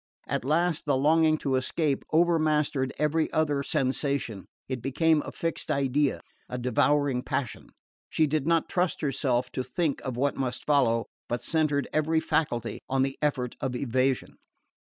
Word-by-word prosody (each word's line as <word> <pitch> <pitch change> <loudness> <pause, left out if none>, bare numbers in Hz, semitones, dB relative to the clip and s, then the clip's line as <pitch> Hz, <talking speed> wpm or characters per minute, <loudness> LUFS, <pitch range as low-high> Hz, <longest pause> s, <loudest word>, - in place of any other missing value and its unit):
At - - -2
last 160 +3 +1
the 140 -2 +3
longing 155 +3 +4
to 135 -3 -2
escape 140 +2 -1
over 170 +1 +4
mastered 150 -4 +1
every 155 +1 +1
other 150 -3 +1
sensation. 130 - -2 0.2
It 130 -2 -4
became 150 +4 +2
a - - -7
fixed 165 0 -3
idea, 140 +1 +1 0.3
a 125 - -4
devouring 140 +1 +2
passion. 125 -1 -3 0.4
She 160 - +2
did 150 0 -1
not 165 -1 +2
trust 180 -1 0
herself 130 -4 0
to 130 - -2
think 165 -1 -1
of 130 -2 -4
what 140 +2 +1
must 125 -2 -3
follow, 120 -6 +3 0.2
but 120 - -1
centred 155 -3 +1
every 160 +1 +2
faculty 120 -8 -1
on 135 0 +2
the 135 0 -2
effort 130 -5 -1
of 130 -2 -2
evasion. 130 +1 0
140 Hz, 155 wpm, -27 LUFS, 130-155 Hz, 0.4 s, longing